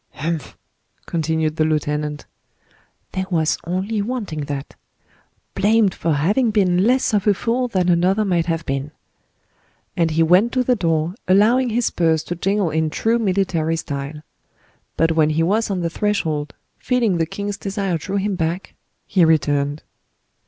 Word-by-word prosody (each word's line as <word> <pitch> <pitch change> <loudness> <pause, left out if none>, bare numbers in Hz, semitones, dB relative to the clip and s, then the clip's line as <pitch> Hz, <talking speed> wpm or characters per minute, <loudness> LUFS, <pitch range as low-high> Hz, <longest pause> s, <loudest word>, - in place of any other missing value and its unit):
"Humph!" 160 -1 -4 0.5
continued 160 -1 -1
the 155 - +3
lieutenant; 150 -1 -1 0.9
"there 185 -1 -3
was 160 -4 +1
only 195 +5 -1
wanting 200 - -4
that. 140 -1 -5 0.8
Blamed 210 -2 +3
for 165 -1 -1
having 205 - +2
been 190 -3 +2
less 255 0 +2
of 205 0 +1
a 205 - +5
fool 240 +5 0
than 185 -6 0
another 180 +4 +2
might 175 -4 0
have 165 -1 -2
been." 135 +1 -2 1.1
And 165 -1 +2
he 160 +1 +2
went 185 +8 +4
to 255 -1 +2
the 250 0 +2
door, 165 -4 0
allowing 225 +7 +4
his 235 +1 0
spurs 160 -2 +1
to 175 - -4
jingle 195 0 0
in 160 0 0
true 225 +9 0
military 185 -6 0
style. 145 -1 -5 0.7
But 165 0 +3
when 160 -1 +3
he 155 +1 +1
was 210 +6 +1
on 190 -3 -1
the 170 - -1
threshold, 160 -8 -1 0.2
feeling 235 -8 +1
the 165 -1 0
king's 200 +3 -4
desire 195 -3 -2
drew 195 +5 -5
him 200 +1 0
back, 170 +2 -3 0.3
he 190 -4 +2
returned. 145 -2 +1
175 Hz, 155 wpm, -20 LUFS, 160-205 Hz, 1.1 s, a